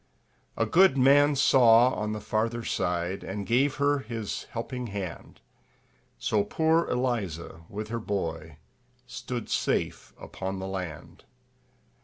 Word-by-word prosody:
A -, -, +2 dB
good 185 Hz, -5 st, +5 dB
man 145 Hz, +2 st, +5 dB
saw 125 Hz, -3 st, +5 dB
on 105 Hz, 0 st, -3 dB
the 110 Hz, -, -3 dB
farther 115 Hz, +3 st, -1 dB
side, 90 Hz, -1 st, -2 dB
And 100 Hz, +1 st, -5 dB
gave 130 Hz, +6 st, +2 dB
her 145 Hz, 0 st, +2 dB
his 115 Hz, -4 st, -5 dB
helping 125 Hz, +1 st, -5 dB
hand; 100 Hz, -5 st, -7 dB, 0.8 s
So 105 Hz, -2 st, +1 dB
poor 160 Hz, +9 st, +1 dB
Eliza, 100 Hz, -10 st, -3 dB
with 105 Hz, +1 st, -6 dB
her 115 Hz, +1 st, -2 dB
boy, 80 Hz, -7 st, -4 dB, 0.5 s
Stood 125 Hz, -1 st, -6 dB
safe -, -, -1 dB
upon 95 Hz, 0 st, -5 dB
the 95 Hz, -, -5 dB
land. 90 Hz, -5 st, -7 dB
110 Hz, 125 wpm, -27 LUFS, 95-130 Hz, 0.8 s, good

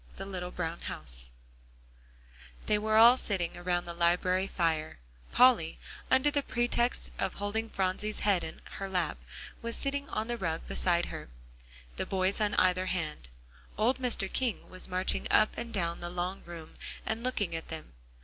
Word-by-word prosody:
VI -, -, -22 dB
THE -, -, -6 dB
LITTLE 180 Hz, -2 st, -4 dB
BROWN 170 Hz, -2 st, -3 dB
HOUSE -, -, -5 dB, 1.4 s
They 210 Hz, -, +3 dB
were 215 Hz, +1 st, +1 dB
all 235 Hz, +3 st, +9 dB
sitting 185 Hz, -8 st, -2 dB
around 175 Hz, 0 st, -1 dB
the 170 Hz, -, -5 dB
library 180 Hz, +2 st, +2 dB
fire; 160 Hz, -4 st, 0 dB, 0.3 s
Polly 245 Hz, -11 st, +5 dB, 0.3 s
under 265 Hz, +3 st, +4 dB
the 285 Hz, -1 st, +2 dB
pretext 240 Hz, -1 st, 0 dB
of 190 Hz, -, -1 dB
holding 220 Hz, +3 st, -2 dB
Phronsie's 195 Hz, +2 st, -1 dB
head 200 Hz, -4 st, +3 dB
in 160 Hz, -, -7 dB, 0.2 s
her 195 Hz, 0 st, -3 dB
lap, 180 Hz, -, 0 dB, 0.4 s
was 230 Hz, 0 st, -1 dB
sitting 280 Hz, 0 st, -1 dB
on 215 Hz, +1 st, -2 dB
the 240 Hz, 0 st, -2 dB
rug 165 Hz, -3 st, -1 dB
beside 175 Hz, -1 st, +2 dB
her, -, -, -7 dB, 0.7 s
the -, -, -2 dB
boys 190 Hz, +2 st, +1 dB
on 210 Hz, -1 st, +2 dB
either 185 Hz, 0 st, +3 dB
hand; 155 Hz, -, -3 dB, 0.5 s
old 235 Hz, +6 st, +2 dB
Mr. 245 Hz, -6 st, +1 dB
King 250 Hz, -5 st, -1 dB
was 185 Hz, 0 st, -6 dB
marching 185 Hz, 0 st, +1 dB
up 215 Hz, -, +4 dB
and 235 Hz, 0 st, -5 dB
down 170 Hz, -5 st, -1 dB
the 175 Hz, -, -5 dB
long 180 Hz, +2 st, -3 dB
room, 165 Hz, -2 st, -9 dB, 0.3 s
and 220 Hz, +1 st, -2 dB
looking 205 Hz, -9 st, -1 dB
at 165 Hz, -, -5 dB
them. 160 Hz, -, -8 dB
185 Hz, 170 wpm, -31 LUFS, 175-220 Hz, 1.4 s, all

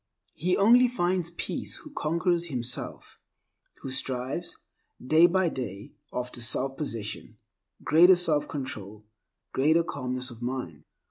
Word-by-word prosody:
He 180 Hz, +3 st, 0 dB
only 240 Hz, +5 st, +6 dB
finds 180 Hz, -7 st, 0 dB
peace 170 Hz, -, -2 dB
who 305 Hz, -, -12 dB
conquers 170 Hz, -, 0 dB
himself, 125 Hz, -6 st, -5 dB, 0.6 s
who 135 Hz, -, -5 dB
strives, 130 Hz, 0 st, -2 dB, 0.4 s
day 155 Hz, +7 st, +5 dB
by 185 Hz, +1 st, +2 dB
day, 105 Hz, -8 st, -6 dB, 0.2 s
after 125 Hz, 0 st, -4 dB
selfpossession, 125 Hz, -2 st, -2 dB, 0.5 s
greater 175 Hz, +4 st, +7 dB
self 155 Hz, -4 st, +2 dB
control, 110 Hz, -7 st, -6 dB, 0.5 s
greater 160 Hz, +5 st, +3 dB
calmness 130 Hz, -4 st, -4 dB
of 120 Hz, 0 st, -12 dB
mind. 120 Hz, -, -5 dB
140 Hz, 115 wpm, -27 LUFS, 125-175 Hz, 0.6 s, greater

